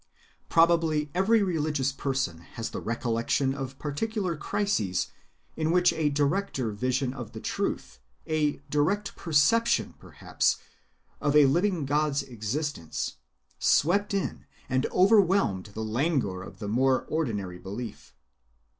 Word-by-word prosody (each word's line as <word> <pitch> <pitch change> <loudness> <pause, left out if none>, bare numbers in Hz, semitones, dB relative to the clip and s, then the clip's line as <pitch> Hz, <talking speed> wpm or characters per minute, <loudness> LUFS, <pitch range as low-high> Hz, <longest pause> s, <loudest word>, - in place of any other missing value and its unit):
Probably 165 -3 +3
every 205 +4 +3
religious 150 -7 0
person 135 -12 -2 0.2
has 115 -1 -3
the - - -4
recollection 115 +3 0
of 135 -1 -6
particular 185 +4 -2
crises 150 - -1 0.5
in 155 0 -1
which 180 +1 +4
a 155 -2 +1
directer 145 - 0
vision 125 +4 -1
of 120 -5 -8
the - - -6
truth, 65 - -3 0.3
a 150 -2 +1 0.2
direct 190 +8 0
perception, 200 +10 +2
perhaps, - - -1 0.6
of 145 0 +1
a 150 -1 +8
living 175 +3 +1
God's 145 0 +1
existence, 120 - -4 0.4
swept 200 +7 +3
in 195 - -3 0.2
and 130 +1 +1
overwhelmed 190 - +3
the 110 - -3
languor 120 - 0
of - - -10
the 105 - -6
more 130 +4 +2
ordinary 105 - -2
belief. 100 +5 -8
145 Hz, 120 wpm, -27 LUFS, 120-170 Hz, 0.6 s, a